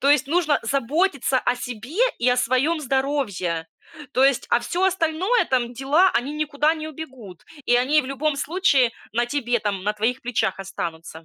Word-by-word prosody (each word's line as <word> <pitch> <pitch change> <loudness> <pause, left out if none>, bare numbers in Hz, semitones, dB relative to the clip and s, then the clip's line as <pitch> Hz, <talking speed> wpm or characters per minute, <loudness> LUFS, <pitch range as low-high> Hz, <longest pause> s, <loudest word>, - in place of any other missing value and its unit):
То 280 - +3
есть 290 -3 +3
нужно 310 -1 +2
заботиться 275 0 0
о 245 0 0
себе 245 - -7 0.2
и 245 - +2
о 250 - +3
своем 255 +7 +1
здоровье, 260 - -1 0.5
то 255 - +2
есть, 270 -2 +3
а 235 - +3
всё 355 +8 -3
остальное, 370 +4 +1
там, 245 -2 0
дела, 285 +9 +3
они 275 +5 -1
никуда 300 +1 +1
не 310 -1 -6
убегут 260 - -10 0.2
и 245 - +3
они 270 +5 +3
в - - -9
любом 280 +2 -1
случае 280 -6 +2 0.2
на 240 +2 +1
тебе, 240 -2 -1
там, 200 -3 -2
на 210 +2 -1
твоих 230 +5 -1
плечах 235 -6 -1
останутся. 165 -4 -6
265 Hz, 175 wpm, -23 LUFS, 240-305 Hz, 0.5 s, То